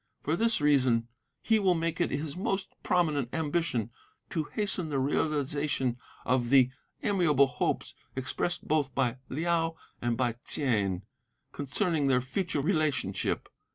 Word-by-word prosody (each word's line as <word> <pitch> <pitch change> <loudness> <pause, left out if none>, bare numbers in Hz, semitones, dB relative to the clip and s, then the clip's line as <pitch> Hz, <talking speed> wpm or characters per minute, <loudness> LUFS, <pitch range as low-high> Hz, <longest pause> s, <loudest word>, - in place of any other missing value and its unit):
For 155 - +1
this 230 +3 +2
reason 130 -6 +3 0.3
he 220 -1 +4
will 190 -3 +3
make 165 0 -1
it - - +2
his 145 +1 -3
most 195 0 -1
prominent 150 -8 +1
ambition 160 -8 0 0.4
to 160 -4 -1
hasten 195 -3 -2
the 140 - -1
realization 140 -2 0 0.3
of 125 -2 +1
the 130 -1 +6 0.3
amiable 165 -9 +4
hopes 125 -2 -2 0.2
expressed 130 +7 -2
both 150 -3 +1
by 125 -2 +1
Liao 165 +2 0 0.3
and 120 -1 0
by 120 -2 0
Ts'ain, 100 -9 0 0.5
concerning 145 +1 0
their 130 -2 +4
future 145 +4 -2
relationship. 145 - 0
145 Hz, 130 wpm, -29 LUFS, 130-170 Hz, 0.5 s, the